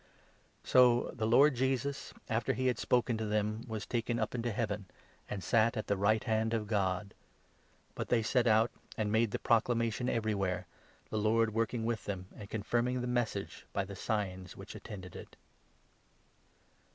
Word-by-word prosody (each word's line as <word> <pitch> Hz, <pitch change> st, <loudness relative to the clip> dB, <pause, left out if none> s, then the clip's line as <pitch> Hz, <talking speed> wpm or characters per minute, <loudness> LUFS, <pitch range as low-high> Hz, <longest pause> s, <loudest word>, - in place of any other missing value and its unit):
So 125 Hz, -1 st, +5 dB
the 110 Hz, -2 st, -1 dB
Lord 140 Hz, +6 st, +6 dB
Jesus, 135 Hz, +2 st, -1 dB, 0.2 s
after 110 Hz, 0 st, 0 dB
he 130 Hz, +3 st, -2 dB
had 125 Hz, -1 st, +1 dB
spoken 120 Hz, -2 st, +1 dB
to 110 Hz, -, -1 dB
them, 105 Hz, +1 st, -1 dB
was 110 Hz, -3 st, -4 dB
taken 120 Hz, 0 st, -1 dB
up 110 Hz, -2 st, -1 dB
19 125 Hz, -, -2 dB
into 120 Hz, 0 st, -1 dB
Heaven, 105 Hz, -4 st, -2 dB, 0.4 s
and 100 Hz, -3 st, -4 dB
sat 115 Hz, +1 st, +3 dB
at 110 Hz, -, -2 dB
the 100 Hz, -, +1 dB
right 110 Hz, +4 st, +2 dB
hand 110 Hz, -1 st, +1 dB
of 110 Hz, -2 st, -1 dB
God. 100 Hz, -2 st, -1 dB, 0.8 s
But -, -, -5 dB
they 115 Hz, -2 st, +3 dB
set 125 Hz, +2 st, +2 dB
20 -, -, +4 dB
out, 110 Hz, +2 st, +4 dB, 0.3 s
and 105 Hz, -1 st, 0 dB
made 110 Hz, +1 st, +3 dB
the -, -, -2 dB
proclamation 115 Hz, +1 st, +1 dB
everywhere, 100 Hz, -5 st, 0 dB, 0.5 s
the 110 Hz, -, -1 dB
Lord 110 Hz, +1 st, +2 dB
work 115 Hz, +2 st, 0 dB
ing 115 Hz, -2 st, -2 dB
with 115 Hz, -1 st, -2 dB
them, 95 Hz, -3 st, -4 dB
and 100 Hz, -2 st, -10 dB
confirming 120 Hz, +4 st, 0 dB
the -, -, -2 dB, 0.2 s
Message 105 Hz, -4 st, -6 dB
by 100 Hz, -, 0 dB
the 100 Hz, +1 st, -8 dB
signs 95 Hz, -3 st, -3 dB
which -, -, -9 dB
attended 95 Hz, -4 st, -9 dB
it. -, -, -10 dB
110 Hz, 175 wpm, -33 LUFS, 105-120 Hz, 0.8 s, Lord